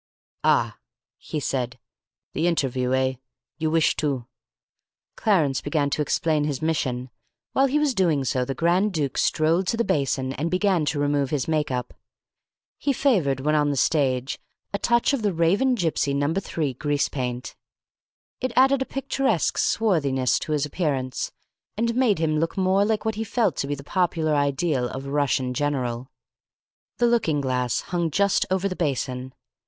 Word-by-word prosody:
"Ah," - - +2 0.4
he 155 - -4
said, 125 -3 -2 0.6
"the 160 +4 +1
interviewer, 130 -6 0
eh? 130 0 +1 0.5
You 160 0 0
wish 160 0 +3
to 135 -6 -1 0.5
" - - -62
Clarence 160 - +2
began 145 -1 0
to 150 - 0
explain 150 0 +1
his 145 -3 -2
mission. 130 -6 -1 0.4
While 270 +1 +4
he 275 +3 +1
was 300 -3 +2
doing 170 - +2
so 130 0 0
the 135 +2 -4
Grand 180 +5 +2
Duke 145 -5 -1
strolled 165 +4 +2
to 230 - 0
the 235 - +2
basin 135 - 0
and 150 +5 -2
began 185 -2 +2
to 150 - -1
remove 145 -1 +1
his 145 -3 -1
make 155 -2 0
up. 125 -1 -3 0.9
He 280 - +1
favoured, 180 - +1
when 150 +3 +1
on 150 -1 +3
the 145 - 0
stage, 130 -3 +1 0.3
a 200 - -1
touch 235 +5 +2
of 275 - 0
the 205 -2 +1
Raven 195 +11 +2
Gipsy 160 - 0
No. 145 +3 +1
3 165 -6 -2
grease 145 +2 0
paint. 125 -2 -4 0.8
It 255 -2 -2
added 270 +1 +4
a - - +1
picturesque 275 0 0
swarthiness 140 - +1
to 155 - -5
his 150 -1 +1
appearance, 140 -5 -2 0.5
and 235 +1 +1
made 240 -4 +3
him 155 -1 +1
look 165 +4 -2
more 190 +1 +3
like 220 0 -1
what 220 - +1
he - - 0
felt 230 +2 0
to 140 - -1
be 145 - -1
the 140 - -10
popular 165 -1 0
ideal 140 -2 +1
of 135 +1 -6
a 140 - -6
Russian 135 -3 +1
general. 130 -3 -2 0.9
The 240 - +3
looking 225 -11 +2
glass 125 -3 0
hung 170 -2 -1
just 200 +5 +2
over 190 +1 +1
the 185 - -4
basin. 130 -5 -2
150 Hz, 170 wpm, -24 LUFS, 135-190 Hz, 0.9 s, While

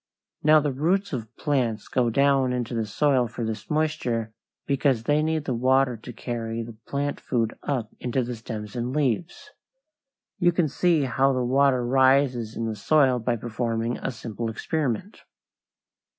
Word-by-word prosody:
Now 155 +1 +6
the 145 -1 -1
roots 180 +7 0
of 115 -2 -5
plants 125 -7 -1
go 125 -2 +1
down 135 0 +3
into 125 -1 -3
the 115 -2 -1
soil 130 +2 +2
for 115 +1 -5
this 110 -1 -5
moisture, 150 -8 -1 0.3
because 135 -4 +1
they 145 +4 +2
need 155 -1 -1
the 130 - -1
water 130 +1 +2
to 115 +2 -9
carry 115 -1 -4
the 115 0 -10
plant 145 +1 -2
food 115 -3 -1
up 125 -6 -2
into 125 +1 -1
the 120 +1 -4
stems 110 -2 -7
and 125 +2 -3
leaves. 160 - -1 0.9
You 175 -2 +4
can 170 -2 +2
see 165 +1 +2
how 135 +2 +2
the 130 -1 0
water 130 -1 +3
rises 130 -3 +3
in 115 - -2
the 110 -1 -2
soil 130 +2 +3
by 120 +1 0
performing 115 0 -2
a - - -3
simple 115 -1 -5
experiment. 150 - -3
125 Hz, 165 wpm, -25 LUFS, 115-145 Hz, 0.9 s, Now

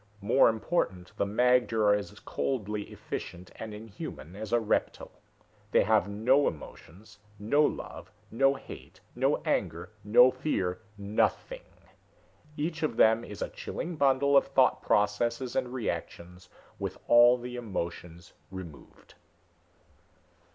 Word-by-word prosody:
More 115 +6 +4
important, 110 - -2
the - - +1
magter 120 0 +2
are 105 - +5
as 105 -1 -2
coldly 105 -5 -3
efficient 90 +1 -7
and 110 -1 -7
inhuman 105 -5 -9
as 110 +1 -7
a 120 - +4
reptile. 110 - -2 0.6
They - - +4
have 110 -1 +2
no 125 +8 +3
emotions, 100 +7 -9 0.2
no 115 +9 +2
love, - - -4 0.2
no 135 +4 +3
hate, - - -12 0.2
no - - +2
anger, - - -2
no 125 +5 +6
fear 95 -10 -2 0.2
nothing. 105 - -1 1.0
Each 155 +2 -3
of 150 -7 -1
them 110 +1 +5
is 105 - -6
a - - -4
chilling 175 0 -6
bundle 140 -1 +3
of 140 - +5
thought 135 -1 +3
processes 115 +4 0
and 125 - -1
reactions, 90 -5 -5 0.3
with - - -4
all 120 +1 +7
the 125 0 -7
emotions 85 -6 -6 0.2
removed." 95 -5 -11
110 Hz, 125 wpm, -29 LUFS, 100-125 Hz, 1.0 s, all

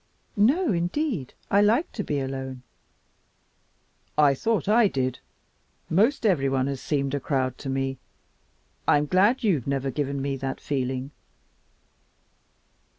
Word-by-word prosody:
"No, 270 - +3
indeed, 175 - -2 0.2
I 200 - +5
like 225 +10 +2
to 210 - -4
be 145 -5 -1
alone." 130 -1 -5 1.5
"I 145 -2 +5
thought 220 +9 -1
I 220 +1 +5
did. 130 -6 -2 0.7
Most 225 - +2
everyone 135 -9 +2
has 140 -1 -3
seemed 140 -2 -1
a 145 - 0
crowd 130 -3 -1
to 135 - -6
me. 135 0 -2 0.9
I'm 150 0 +4
glad 200 - +3
you've 165 - +1
never 135 -1 -1
given 140 0 -2
me 135 0 -2
that 135 0 -4
feeling. 130 -1 -3
140 Hz, 125 wpm, -25 LUFS, 135-205 Hz, 1.5 s, I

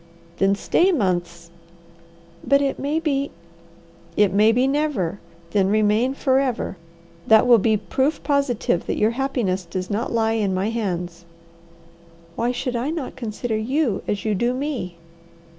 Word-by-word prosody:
"Then 195 +1 +3
stay 350 - +2
months." 175 - -2 0.9
"But 280 0 +4
it 275 -1 -1
may 295 +3 0
be 280 -3 -1 0.4
" 170 0 -27
"It 190 - -3
may 210 +2 +5
be 250 +3 +2
never! 270 - -1 0.3
Then 195 -2 +2
remain 215 +5 +2
forever. 265 -6 0 0.5
That 220 -1 +6
will 240 -2 +6
be 215 +2 +2
proof 265 - -1
positive 275 - 0
that - - -1
your 215 +2 +3
happiness 235 -8 -1
does 185 +2 -5
not 220 +4 -2
lie 225 -1 +1
in 195 -2 0
my 195 +4 0
hands." 180 -6 -3 1.1
"Why 240 +1 0
should 250 0 -3
I 240 +5 -1
not 315 -4 -4
consider 230 -1 -3
you 245 0 0
as 205 0 -2
you 215 - +1
do 240 +5 0
me?" 255 - -4
225 Hz, 150 wpm, -22 LUFS, 195-270 Hz, 1.1 s, That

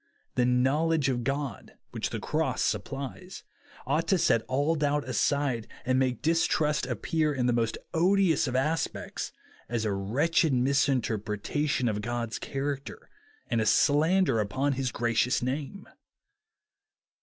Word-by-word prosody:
The 125 -1 +2
knowledge 140 +4 +2
of 120 -2 -1
God, 135 -4 -4 0.2
which - - -3
the - - -4
cross - - -1
supplies, 140 +7 -4 0.4
ought - - 0
to 190 - +3
set 115 -9 +3
all 145 +5 +1
doubt 150 -2 0
aside, 130 -2 0 0.2
and 130 +1 +2
make 130 -3 0
distrust 155 -3 +1
appear 150 +5 0
in 125 -2 0
the 125 - +2
most 115 -1 0 0.2
odious 175 -2 +3
of 125 - -3
aspects, 150 +5 -2 0.4
as 115 -2 -1
a 105 - 0
wretched 140 +11 +1
misrepresentation 125 0 0
of 105 -2 -1
God's 120 0 -3
character 140 0 -5 0.3
and 115 - 0
a - - 0
slander 155 - +3
upon 130 +8 0
his 130 -2 -2
gracious 120 +2 +1
name. 140 +9 -4
135 Hz, 130 wpm, -28 LUFS, 120-150 Hz, 0.4 s, to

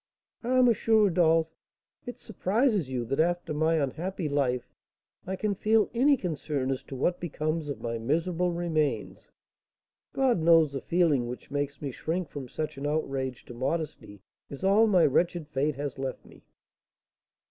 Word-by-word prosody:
"Ah, 255 +2 +1
M. 240 - +5
Rodolph, 170 -7 +4 0.5
it 245 - -6
surprises 210 - 0
you 125 -2 -2
that, 135 +5 -2
after 175 -1 +1
my 160 +2 +2
unhappy 160 +5 -2
life, 130 -4 0 0.6
I 190 - -2
can 205 +2 -1
feel 215 +2 +2
any 275 +4 +4
concern 150 - -2
as 130 - -2
to 135 - -8
what 175 +7 0
becomes 155 -2 -3
of 140 - -5
my 115 -1 -2
miserable 165 +8 0
remains! 155 -9 -2 0.8
God 260 -7 +2
knows, 165 -2 +5
the 135 - -3
feeling 160 -8 +2
which 125 +2 -8
makes 145 0 -3
me 140 - -2
shrink 165 +5 -3
from 135 -4 -7
such 155 -1 -4
an 145 - -2
outrage 135 -4 -2
to - - -10
modesty 130 - -4 0.3
is 140 - -9
all 205 +4 +5
my 185 -5 +5
wretched 170 +2 +1
fate 145 0 -1
has 140 -1 -5
left 135 -1 -4
me!" - - -17
155 Hz, 160 wpm, -28 LUFS, 135-180 Hz, 0.8 s, M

